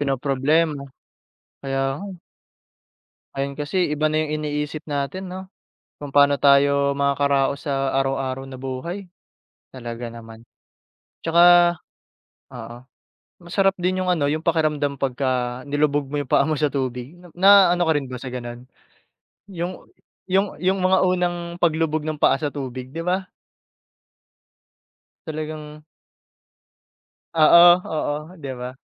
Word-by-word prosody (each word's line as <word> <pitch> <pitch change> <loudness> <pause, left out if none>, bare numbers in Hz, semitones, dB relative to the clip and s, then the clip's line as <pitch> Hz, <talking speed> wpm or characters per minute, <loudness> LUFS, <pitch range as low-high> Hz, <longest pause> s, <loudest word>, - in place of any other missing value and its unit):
pinoproblema, 140 +2 0 0.8
kaya 135 -1 -2 0.2
nga 200 - -7
eh. 185 - -11 1.2
Ngayon 140 0 -3
kasi 145 +5 -4 0.2
iba 155 +1 0
na 155 - -1
yung 155 0 -3
iniisip 150 +1 -3
natin 145 +7 -3
no, 185 +1 -6 0.6
kung 145 - -6
paano 140 -1 +4
tayo 140 0 +4
makakaraos 140 0 0
sa 135 -1 -1
araw-araw 135 0 -3
na 130 - -8
buhay, 135 +9 -5 0.7
talaga 120 -2 -7
naman. 115 -1 -12 0.8
'Tsaka 175 +1 +5 0.8
oo 115 +1 -8 0.7
masarap 195 +2 +1
din 185 +1 -1
yung 185 - -2
ano 175 -5 +1
yung 150 +2 0
pakiramdam 155 -4 0
pagka 130 -2 -2
nilubog 145 -1 0
mo 145 - -4
yung 145 -3 -4
paa 140 - +3
mo 155 - 0
sa 150 0 0
tubig, 130 0 -3 0.2
na 190 -1 +7
ano 175 - +1
ka 160 - +2
rin 145 -3 -2
ba 130 - -6
sa 125 0 -8
ganun? 120 -1 -7 0.8
'Yung 180 -1 -5 0.5
yung 195 +1 0
yung 190 +2 +1
mga 185 +1 +4
unang 180 -1 0 0.2
paglubog 160 -2 0
ng 155 -1 -4
paa - - +4
sa 145 +1 -3
tubig 130 -2 -6
'di 165 - -6
ba? 185 +1 -1 2.0
Talagang 155 -1 -7 1.5
Oo, 165 +2 +7 0.2
oo, 150 -2 -2 0.3
di 140 - -5
ba? 125 +1 -6
145 Hz, 130 wpm, -22 LUFS, 135-170 Hz, 2.0 s, na